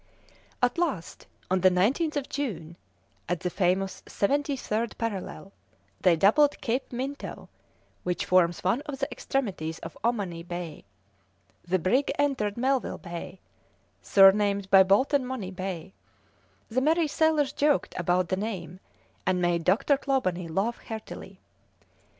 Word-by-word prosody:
At 245 +7 +2
last, 270 - -3 0.2
on 185 -1 +2
the 185 - +7
19th 255 - +1
of 285 -2 -2
June, 175 - -4 0.5
at 175 -1 -1
the 180 -2 -2
famous 190 +1 0
seventy 285 +6 0
third 225 -1 -2
parallel, 200 -3 -4 0.5
they 180 -3 +4
doubled 250 - +4
Cape 250 +2 -2
Minto, 265 +4 -5 0.5
which 180 -1 -2
forms 175 -2 +3
one 205 +9 +1
of 285 -2 -4
the 275 0 -1
extremities 185 -12 -2
of - - -9
Ommaney 200 -8 -1
Bay; 175 - -7 0.8
the 180 +2 +1
brig 225 - +1
entered 265 -8 0
Melville 260 +1 0
Bay, 175 +1 -8 0.6
surnamed 200 0 +4
by 195 - +9
Bolton 260 +9 +3
Money 250 -7 -5
Bay; 185 -1 -5 0.7
the 245 +3 0
merry 320 +4 +3
sailors 305 -1 +2
joked 290 0 +1
about 180 0 +1
the - - +1
name, 185 -4 -5 0.5
and 185 -1 +2
made 175 -1 +1
Dr. 220 - +3
Clawbonny 185 -12 -1
laugh 195 +8 -1
heartily. 220 -1 -8
200 Hz, 130 wpm, -27 LUFS, 180-265 Hz, 0.8 s, by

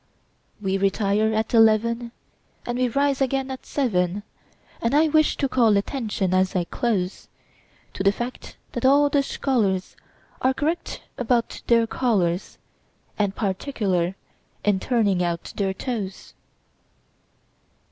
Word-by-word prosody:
We 195 -1 -1
retire 200 +2 +2
at 220 +2 -1
eleven, 230 +1 +3 0.5
And 240 +1 -2
we 255 - +3
rise 280 +2 +1
again 270 0 0
at 260 - -8
seven; 200 -7 0 0.6
And 230 +4 +1
I 310 +1 +4
wish 310 0 +3
to 275 - +1
call 230 -5 +3
attention, 205 -4 -1
as 185 0 +2
I 180 - +2
close, 190 0 -2 0.7
To - - -5
the 195 0 +4
fact 240 +4 -6
that 240 - -4
all 285 +2 +5
the 285 - +3
scholarsAre 255 0 -2
correct 320 +5 -2 0.2
about 240 -1 0
their 230 -1 +4
collars, 195 -8 0 0.6
And 200 -1 +1
particular 190 -4 -1 0.5
in 205 -2 +3
turning 205 -6 +1
out 170 -1 -2
their 195 -2 0
toes. 200 -2 -5
225 Hz, 125 wpm, -24 LUFS, 195-255 Hz, 0.7 s, all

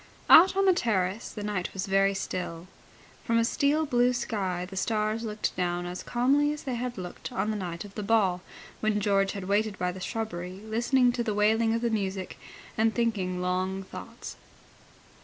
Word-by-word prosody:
Out 380 +3 +8
on 390 - +3
the 380 - +6
terrace 205 - 0
the 210 - -7
night 205 -3 -3
was 190 - -2
very 195 0 +2
still. 180 -3 -4 0.6
From 230 -1 +1
a 230 - +3
steel 290 +6 +1
blue 245 -2 +3
sky 190 -7 -2
the 195 - -10
stars 215 +2 0
looked 215 -1 -3
down 175 -1 -1
as 180 +1 -5
calmly 275 +5 +2
as 300 - -6
they 260 - -3
had 245 0 -3
looked 180 -1 -7
on 205 +3 -1
the - - -2
night 175 -3 -5
of 200 - -12
the 210 - -5
ball, 200 -4 +2 0.4
when 215 -1 +1
George 195 -1 +2
had 200 - -5
waited 205 +1 0
by 180 0 -1
the 185 - -9
shrubbery 185 -4 -4
listening 240 +3 +2
to 240 -1 -2
the 215 -3 -2
wailing 225 +2 +3
of 230 - -1
the 235 -1 0
music 195 -3 -3 0.4
and 220 0 +3
thinking 190 -6 -1
long 185 +1 -1
thoughts. - - -9
210 Hz, 190 wpm, -28 LUFS, 185-230 Hz, 0.6 s, Out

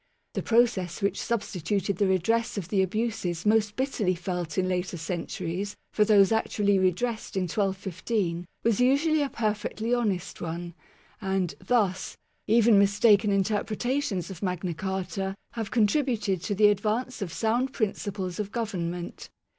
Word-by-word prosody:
The - - -2
pro 235 +1 +5
cess 190 -4 -5
which 200 0 0
substituted 200 -4 -1
the 200 - +2
redress 220 +5 +1
of 180 -3 -4
the 195 -1 +2
abuses 190 -3 -2
most 210 -1 +3
bitterly 240 -8 0
felt 175 -1 -4
in 185 -1 +2
later 180 -1 -2
centuries 175 +3 -4 0.2
for 210 - +4
those 205 -2 +5
actually 205 -3 +2
re 185 0 +5
dressed 230 +5 -4
in 190 - +1
1215 190 -1 -2 0.2
was 230 -3 +2
usually 295 +5 +3
a 285 - 0
perfectly 220 +1 -2
honest 200 -6 -1
one; 170 +1 -4 0.5
and, 190 -3 0
thus, 200 -6 0 0.3
even 225 -1 +5
mistaken 205 +1 +4
interpretations 210 - 0
of 180 - -9
Magna 180 -2 -2
Carta 190 +2 -3 0.2
have 225 -3 -4
contributed 215 - +1
to 205 - -1
the 210 +1 +6
advance 215 +5 -1
of 185 -4 -3
sound 235 +7 0
prin 220 -6 0
ciples 190 -3 -5
of 205 -1 -3
government. 180 -7 -4
200 Hz, 145 wpm, -27 LUFS, 185-225 Hz, 0.5 s, the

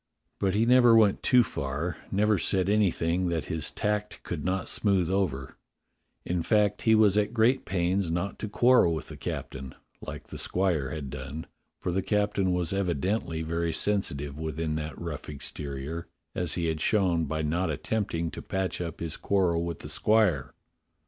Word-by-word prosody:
But 95 -1 +1
he 110 +2 +3
never 120 -1 +6
went 105 -3 +4
too 125 -1 +5
far, 75 +1 -3
never 105 0 +2
said 95 +2 +1
anything 90 -4 +1
that 85 -2 -1
his 80 -1 -1
tact 105 0 -2
could 80 -4 -4
not 95 +1 -1
smooth 95 -4 +1
over; 80 -9 -1 0.7
in 90 -1 -1
fact, 105 +2 +2
he 110 -1 +4
was 105 -2 +5
at 105 +3 -1
great 120 +4 +3
pains 90 0 0
not 85 +4 -2
to 105 - -4
quarrel 120 -7 +4
with 80 - -6
the - - -8
captain, 65 -1 -6 0.3
like - - -7
the - - -8
squire 90 -8 0
had 70 -2 -5
done, 70 +5 -6 0.3
for 90 - -2
the 95 +2 0
captain 100 -2 +1
was 90 0 0
evidently 90 -2 -1
very 85 +1 -1
sensitive 75 -8 -1
within 80 0 -2
that 75 0 -5
rough 85 -5 -6
exterior, 75 +2 -5 0.3
as 90 -3 -1
he 85 - -1
had 80 -1 -1
shown 90 -6 +2
by 80 +1 -2
not 85 +5 0
attempting 85 -7 -2
to - - -7
patch 95 -2 -2
up 85 -2 -5
his 85 -1 -3
quarrel 90 -4 +1
with 85 -2 -4
the - - -4
squire. 90 - +2
90 Hz, 170 wpm, -28 LUFS, 80-100 Hz, 0.7 s, never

